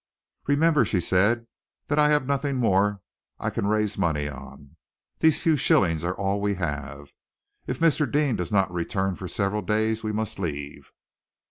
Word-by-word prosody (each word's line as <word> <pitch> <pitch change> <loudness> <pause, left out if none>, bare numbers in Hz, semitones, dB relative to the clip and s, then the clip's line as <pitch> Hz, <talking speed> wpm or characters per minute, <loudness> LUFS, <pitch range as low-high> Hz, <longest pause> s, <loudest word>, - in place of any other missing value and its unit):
"Remember," 150 +1 +3
she 95 - 0
said, 100 +7 +2 0.4
"that 145 +1 +1
I 150 0 +5
have 150 -3 +2
nothing 140 0 -1
more 105 -4 +2 0.4
I - - -2
can 100 - -2
raise 105 -1 0
money 75 -5 0
on. 70 0 -11 0.4
These 160 -2 +3
few 160 -2 +4
shillings 80 - +2
are 90 +1 -1
all 100 +1 -1
we 100 0 0
have. 75 -4 -5 0.6
If 125 - -2
Mr. 155 -2 +2
Deane 145 -4 +2
does 90 - -4
not 95 -3 +2
return 95 +2 -1
for 90 - -7
several 105 +1 -1
days, 110 +3 0
we 110 - -2
must 110 -2 -3
leave." 75 -5 -5
100 Hz, 165 wpm, -25 LUFS, 85-125 Hz, 0.6 s, I